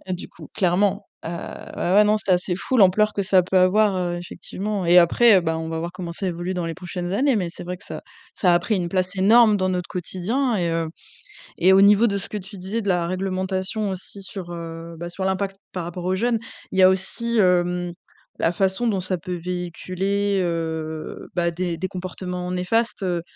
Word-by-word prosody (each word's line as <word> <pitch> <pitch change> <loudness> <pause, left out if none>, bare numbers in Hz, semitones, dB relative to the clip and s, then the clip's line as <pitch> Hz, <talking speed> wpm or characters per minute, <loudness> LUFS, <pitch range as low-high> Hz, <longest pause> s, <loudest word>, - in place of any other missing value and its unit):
Hein, - - -1
du 180 - -5
coup, - - -13
clairement, 195 +2 +1 0.2
heu, - - -4
ouais, 175 +1 -4
ouais, 210 - +7
non, 210 +1 +3
c'est 210 - -4
assez 180 0 +2
fou, 230 +8 -2
l'ampleur 210 0 +5
que 200 - -1
ça 190 -1 +4
peut 185 +2 -1
avoir, 190 +2 +4
heu, 175 -1 -1
effectivement, 190 +2 -4
et 175 +1 +7
après, 195 +4 +6
ben, 160 -1 -1
on 160 0 -4
va 160 0 -3
voir 170 +1 -3
comment 175 -2 -6
ça 190 +2 -3
évolue 175 +1 -3
dans 180 -1 -2
les 165 - -3
prochaines 180 +1 -5
années, 265 +5 +2
mais 185 -5 0
c'est 175 - -9
vrai 180 +1 -4
que - - -14
ça - - -7 0.3
ça 180 -3 +3
a 175 - +5
pris 215 - 0
une 175 -2 -1
place 185 +1 -1
énorme 215 +3 +6
dans 185 -1 0
notre 180 -1 -2
quotidien 215 +9 -1
et 175 -3 0
heu, 165 0 0 0.7
et 185 +3 +5
au 195 - +7
niveau 210 +3 +6
de 200 - 0
ce 195 - -7
que 210 - -4
tu 195 +1 -9
disais, 195 +5 -3
de 200 - -6
la 175 -2 +2
réglementation 190 +3 -2
aussi 190 +1 -8
sur, 190 -2 -7
heu, 165 0 -7
bah, 175 +1 -5
sur 190 +2 -5
l'impact 195 +1 -1
par 180 -2 -4
rapport 175 +1 -6
aux 185 +1 +1
jeunes. 230 +3 +1 0.3
Il 190 - -1
y - - +7
a 185 - +8
aussi, 230 +5 -1
hem, 180 -2 +2 0.5
la 165 - +2
façon 190 +6 0
dont 200 -4 +1
ça 185 0 -1
peut 180 +1 -4
véhiculer, 185 +3 -2
heu, 160 -2 -3
bah, 170 -1 +1
des 175 0 -3
des 185 +3 -2
comportements 180 0 -5
néfastes. 205 +5 0
Heu, 175 -2 0
185 Hz, 220 wpm, -23 LUFS, 175-200 Hz, 0.7 s, a